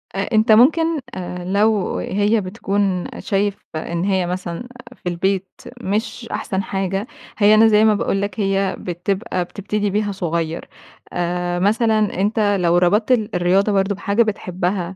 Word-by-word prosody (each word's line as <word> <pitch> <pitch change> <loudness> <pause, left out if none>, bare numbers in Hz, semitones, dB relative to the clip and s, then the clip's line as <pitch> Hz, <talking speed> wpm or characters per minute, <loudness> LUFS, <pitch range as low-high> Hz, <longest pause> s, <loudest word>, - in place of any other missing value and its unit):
أنتَ 215 +3 +2
ممكن 320 +7 +4 0.5
لو 210 -1 +2
هي 205 +3 +1
بتكون 195 -1 -1
شايف 200 -1 -1 0.2
إن 170 +2 -3
هي 190 -2 +1
مثلًا 180 +4 -4 0.3
في 180 - -5
البيت 190 +2 -1 0.3
مش 220 +3 -3
أحسن 190 0 -2
حاجة، 195 +3 -2 0.3
هي 210 0 +5
أنا 225 +1 +6
زي 215 0 +5
ما 215 - +5
باقول 195 0 -1
لك 200 0 -4
هي 195 -1 0
بتبقى 185 +2 -2
بتبتدي 205 +3 -3
بيها 205 +1 0
صغير. 170 -3 -3 0.4
آآ، 175 0 -1
مثلًا 215 -1 +1
أنتَ 205 -1 +2
لو 175 0 +3
ربطت 205 +7 +2
ال 220 -4 +1
الرياضة 185 +4 +2
برضه 195 0 +1
بحاجة 205 +3 +1
بتحبها، 185 -3 -2
200 Hz, 140 wpm, -20 LUFS, 180-215 Hz, 0.5 s, أنا